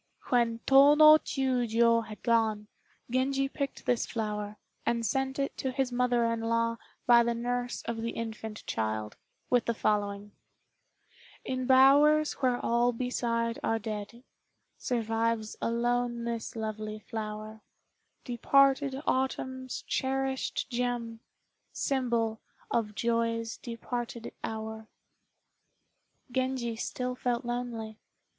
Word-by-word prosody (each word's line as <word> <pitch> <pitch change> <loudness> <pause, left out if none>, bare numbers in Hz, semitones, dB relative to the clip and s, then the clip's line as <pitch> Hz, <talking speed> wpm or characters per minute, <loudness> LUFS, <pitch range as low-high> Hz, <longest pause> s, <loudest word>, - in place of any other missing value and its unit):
When 235 -2 +2
Tô 280 +2 +7
no 310 0 +9
Chiûjiô 235 -4 +2
had 215 -1 -10
gone, 220 -3 +2 0.5
Genji 270 +2 +1
picked 280 0 -5
this 245 -2 +1
flower, 210 -2 -3 0.3
and 235 -1 0
sent 265 +4 -1
it 275 0 -2
to 265 - -1
his 260 -1 -1
mother 245 -1 +2
in 230 0 0
law 230 0 0 0.3
by 240 -1 +7
the 235 0 0
nurse 245 +1 -2
of 235 0 -3
the 230 - -2
infant 220 -2 -6
child, 110 -1 -2 0.4
with 245 -2 +3
the 235 - 0
following: 205 -1 -1 1.1
"In 255 -1 -2
bowers 285 +4 +6
where 250 -2 +2
all 240 +1 +2
beside 230 -1 -1
are 225 - +1
dead 220 +2 -6 0.6
Survives 225 -2 -1
alone 240 0 0
this 235 -1 -4
lovely 215 -1 -4
flower, 215 0 -6 0.6
Departed 275 +3 +3
autumn's 260 0 -2
cherished 265 0 -1
gem, 240 -2 -2 0.5
Symbol 235 -5 0 0.3
of 210 -3 0
joy's 230 0 0
departed 235 0 -5
hour." 220 0 -5 1.4
Genji 255 -2 -1
still 250 +2 -3
felt 245 -1 -2
lonely. 235 -3 -4
235 Hz, 110 wpm, -29 LUFS, 225-255 Hz, 1.4 s, no